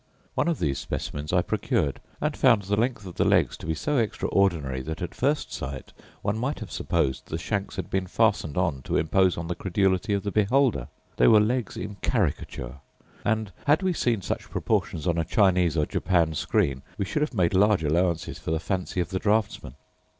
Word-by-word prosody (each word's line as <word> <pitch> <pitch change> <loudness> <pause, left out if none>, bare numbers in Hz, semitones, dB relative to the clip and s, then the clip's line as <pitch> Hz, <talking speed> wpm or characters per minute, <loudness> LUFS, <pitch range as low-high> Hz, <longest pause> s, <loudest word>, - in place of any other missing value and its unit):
One - - 0
of 170 -3 +1
these 70 -4 -1
specimens 75 +2 -4
I 90 -1 +3
procured, 70 -4 -1 0.2
and - - -1
found 105 -3 +4
the 100 +2 0
length 115 -1 -1
of 90 - -9
the - - +3
legs - - +3
to - - -9
be 80 - 0
so 145 - 0
extraordinary, 85 - 0
that, 80 +4 -5
at 90 - -4
first 145 +3 0
sight, 65 0 -6 0.3
one 105 +2 0
might 135 +5 -1
have 105 -6 -8
supposed 65 - -1
the 80 - -3
shanks 100 +4 -3
had - - -4
been 95 -1 0
fastened 100 -8 +1
on 85 -8 0
to - - 0
impose 90 +3 +2
on 85 - -3
the 90 - -1
credulity 95 +2 0
of 100 - -2
the 100 - -2
beholder: 110 - +2 0.3
they - - +5
were 110 - +7
legs 115 +1 0
in 100 +1 -6
caricature; 75 - -1 0.5
and 110 -1 0 0.2
had 155 +6 +4
we 185 -1 +2
seen 115 - 0
such - - -4
proportions 75 - -1
on 85 -2 +1
a - - +2
Chinese 90 - +3
or 75 - +3
Japan 85 -3 +1
screen 70 -3 0 0.2
we 100 - -1
should 150 - -2
have 150 -4 -1
made 90 -4 +2
large 100 -2 +4
allowances 85 +2 0
for - - -6
the 80 0 +1
fancy 90 +1 -2
of 85 - -3
the 95 - -2
draughtsman. 105 - 0
95 Hz, 200 wpm, -26 LUFS, 80-105 Hz, 0.5 s, were